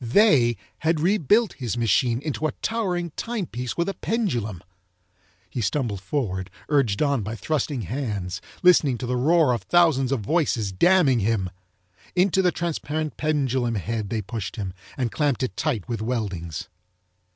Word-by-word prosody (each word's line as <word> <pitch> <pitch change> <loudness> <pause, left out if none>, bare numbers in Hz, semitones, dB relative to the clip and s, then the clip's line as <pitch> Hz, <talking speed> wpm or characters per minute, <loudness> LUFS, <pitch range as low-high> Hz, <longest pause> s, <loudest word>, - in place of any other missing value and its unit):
THEY 120 - +4 0.2
had 160 0 +1
rebuilt 205 - +3
his 125 -3 -4
machine 120 +3 +2
into 155 0 -1
a 150 - -4
towering 180 -7 -2
timepiece 170 - -4
with 170 - +1
a 195 - -1
pendulum. 120 - -2 0.8
He 120 +7 -4
stumbled 110 -3 -1
forward, 95 -4 -2 0.2
urged 135 -7 +2
on 140 -4 +1
by 110 +3 -4
thrusting 145 -2 -1
hands, 105 - -3 0.2
listening 155 -8 +5
to 125 - -5
the 125 +1 -1
roar 150 +1 +4
of 120 - -2
thousands 160 -7 +3
of 135 -5 0
voices 115 - 0
damning 150 - +4
him. 100 -3 0 0.6
Into 190 +1 +3
the 180 -1 +3
transparent 155 -2 -3
pendulum 130 -6 0
head 105 +1 -3
they 110 0 -2
pushed 105 -1 -5
him 95 -4 -4 0.2
and 125 -4 -1
clamped 145 -4 0
it 130 - -2
tight 130 - -1
with 115 -3 -3
weldings. 100 -9 -3
130 Hz, 150 wpm, -24 LUFS, 110-160 Hz, 0.8 s, listening